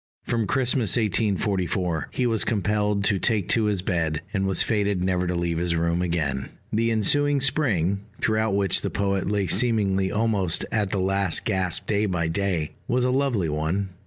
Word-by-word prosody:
From 115 -3 -1
Christmas 125 -3 +1
1844 95 -5 0
he 125 - -2
was 115 -3 +1
compelled 105 -1 0
to 100 0 +2
take 105 -5 +1
to 115 -2 +2
his 100 -4 -1
bed, 80 -5 -1
and 95 -2 0
was 95 - +2
fated 100 -4 0
never 90 -1 0
to 90 - -1
leave 85 -1 -1
his 85 -1 0
room 85 +1 0
again. 75 -7 -2 0.2
The 115 +2 +1
ensuing 145 +7 +2
Spring, 105 - +1 0.2
throughout 110 -2 +1
which 100 -3 +2
the - - -2
poet 100 -1 -1
lay 100 -1 0
seemingly 95 -2 +1
almost 105 -6 0
at 105 -3 0
the 100 - -2
last 95 -1 0
gasp 95 -5 0
day 105 0 +1
by 85 -4 -1
day, 85 -3 -1 0.2
was 125 0 +1
a 125 - +1
lovely 130 -9 +1
one. 80 +6 -2
100 Hz, 175 wpm, -24 LUFS, 90-110 Hz, 0.2 s, to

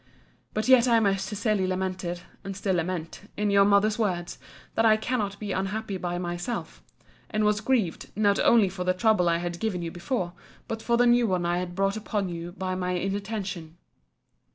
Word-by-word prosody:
But 215 +2 0
yet 255 -1 +6
I 230 -2 +5
most 195 -2 +1
sincerely 205 -1 0
lamented, 185 -2 -2 0.2
(and 195 -1 -6
still 200 -1 0
lament,) 175 +3 -4
in 210 0 +1
your 200 0 +6
mother's 205 +2 +3
words, 180 -5 -1 0.3
That 225 - +2
I 220 -1 +6
cannot 215 -3 -2
be 205 -2 -4
unhappy 195 +2 -2
by 175 -1 -3
myself: 175 +6 -4 0.5
and 215 0 0
was 210 0 +2
grieved, 225 -8 0
not 205 -1 +3
only 225 -4 +5
for 180 0 -4
the 185 0 +1
trouble 185 -3 +3
I 170 - +2
had 175 0 -4
given 195 -6 -2
you 165 - -4
before; 175 0 -3 0.3
but 225 0 -4
for 235 +1 +1
the 245 - +4
new 240 -1 +4
one 180 -3 0
I 175 +1 +1
had 180 -1 -5
brought 195 +2 +1
upon 205 -3 -2
you 170 0 -6
by 185 -1 -3
my 180 0 -1
inattention. 195 -3 -3
195 Hz, 190 wpm, -27 LUFS, 180-215 Hz, 0.5 s, yet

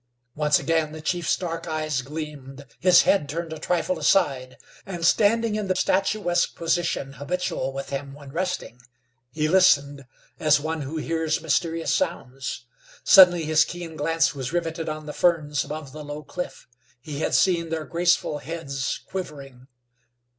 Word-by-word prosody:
Once 150 0 +3
again 160 -2 0
the 155 - -7
chief's 170 +1 0
dark 165 -2 -5
eyes 155 -4 -1
gleamed, 140 -1 -8
his 180 -1 +6
head 150 -8 +2
turned 165 +2 -4
a 160 - -7
trifle 180 - -1
aside, 130 -9 +1 0.3
and, 175 -4 -4
standing 225 +4 +3
in 210 -1 -2
the 185 - +1
statuesque 185 -2 +1
position 165 -5 -1
habitual 160 -1 -3
with 135 +1 -6
him 140 0 -5
when 145 -2 -12
resting, 180 -7 -3 0.5
he 155 +4 -1
listened, 145 -6 +3 0.3
as 150 -1 +4
one 160 +1 -3
who 145 +3 -5
hears 160 0 -1
mysterious 165 +1 0
sounds. 135 -7 -3 0.4
Suddenly 175 -4 +7
his 155 0 +4
keen 175 -2 -7
glance 165 +2 +1
was 130 -2 -5
riveted 165 -2 -2
on 155 0 -5
the 150 - -6
ferns 155 -5 +1
above 150 -1 -7
the 155 +2 -8
low 145 +1 -7
cliff. 180 +5 -7 0.3
He 145 +3 -7
had - - 0
seen 170 -3 +2
their 160 -1 -3
graceful 170 -3 +1
heads 140 -3 -4
quivering. 140 -8 -7
160 Hz, 155 wpm, -24 LUFS, 145-175 Hz, 0.5 s, Suddenly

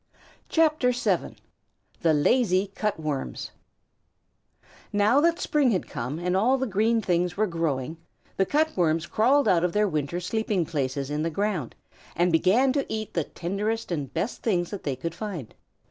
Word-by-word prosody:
THE 305 -7 +1 0.8
LAZY 190 - +2
CUT 210 -4 -2
WORMS 150 -4 -4 1.4
Now 210 +7 +4
that 335 +1 +3
spring 290 -4 +2
had 190 -6 0
come 125 +6 -4
and 180 +2 -1
all 240 +8 +3
the 265 - -1
green 220 +1 +1
things 180 0 0
were 215 - +3
growing, 160 -4 -2 0.4
the 190 - +1
Cut 315 +2 +1
Worms 165 -2 +1
crawled 260 +10 +3
out 175 -2 +4
of 180 - 0
their 210 0 +3
winter 155 0 -2
sleeping 200 -1 -1
places 140 -2 -2
in 150 +1 -1
the 165 - 0
ground, 180 - -2 0.4
and 175 +1 +2
began 200 +11 +3
to 280 -1 -2
eat 215 -1 -4
the 165 -4 0
tenderest 205 +5 -3
and 145 -6 -3
best 230 - -3
things 175 -6 0
that 205 - -5
they 140 -3 -1
could 165 +6 -5
find. 180 - -6
185 Hz, 160 wpm, -26 LUFS, 165-225 Hz, 1.4 s, Now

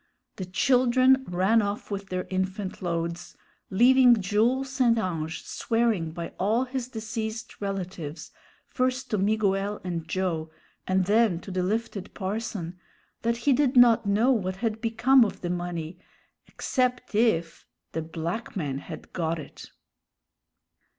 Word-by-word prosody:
The 185 - -4
children 255 +5 +3
ran 190 +6 +3
off 205 +1 -4
with 195 -1 -4
their 185 0 -2
infant 190 +1 -3
loads, 170 0 -3 0.3
leaving 245 +3 +6
Jules 230 +7 +1
St. 250 -4 +3
Ange 165 -6 -3
swearing 225 -8 0
by 170 +1 -5
all 220 +6 +2
his 260 -1 -4
deceased 225 -1 -5
relatives, 185 -6 -5 0.3
first 255 0 -1
to 210 - +1
Miguel 200 0 +1
and 170 -3 -4
Joe, 165 -3 -2 0.4
and 185 0 +2
then 210 -3 +3
to 195 - -9
the 185 0 -1
lifted 205 0 -3
parson, 190 -3 -4 0.4
that 235 0 0
he 285 - +5
did 265 0 +2
not 235 -3 +6
know 215 +6 +3
what 190 -7 0
had 220 +1 -2
become 240 +3 +4
of 210 - -3
the 175 - -2
money 175 -1 -4 0.5
"except 250 -3 -1
if" 205 -7 +1 0.2
the 160 - -2
black 165 +9 -5
man 140 -7 -2
had - - -10
got 165 -2 -1
it. 150 -3 -10
205 Hz, 135 wpm, -26 LUFS, 180-235 Hz, 0.5 s, leaving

